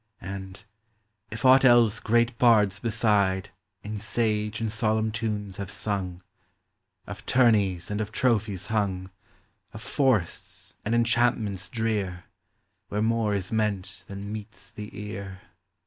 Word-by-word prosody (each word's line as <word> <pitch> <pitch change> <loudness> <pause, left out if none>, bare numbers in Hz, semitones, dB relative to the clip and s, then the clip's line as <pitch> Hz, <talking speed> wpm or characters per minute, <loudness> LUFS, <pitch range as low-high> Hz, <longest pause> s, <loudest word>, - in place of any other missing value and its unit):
And, 95 +2 -7 0.7
if 110 +3 -5
aught 130 +1 +7
else 120 -4 +5
great 120 +1 +2
bards 105 -5 +4
beside 105 -4 +1 0.3
In 105 +1 -5
sage 105 0 -1
and 110 -1 -2
solemn 110 0 +1
tunes 105 -3 -3
have 100 -2 -5
sung, 95 -4 -3 0.4
— - - -51
Of - - -8
tourneys 105 -8 +3
and 105 +1 -1
of 105 -1 -4
trophies 110 -5 0
hung, 95 -4 -1 0.6
Of - - -8
forests, 125 - 0
and 110 +3 0
enchantments 115 -5 +1
drear, 105 -6 -2 0.6
Where 105 +1 -1
more 110 -2 +1
is 95 -2 -3
meant 105 -3 -2
than 100 +1 -6
meets 110 +1 -8
the 105 0 -8
ear. 100 -3 -7
105 Hz, 130 wpm, -26 LUFS, 100-115 Hz, 0.7 s, aught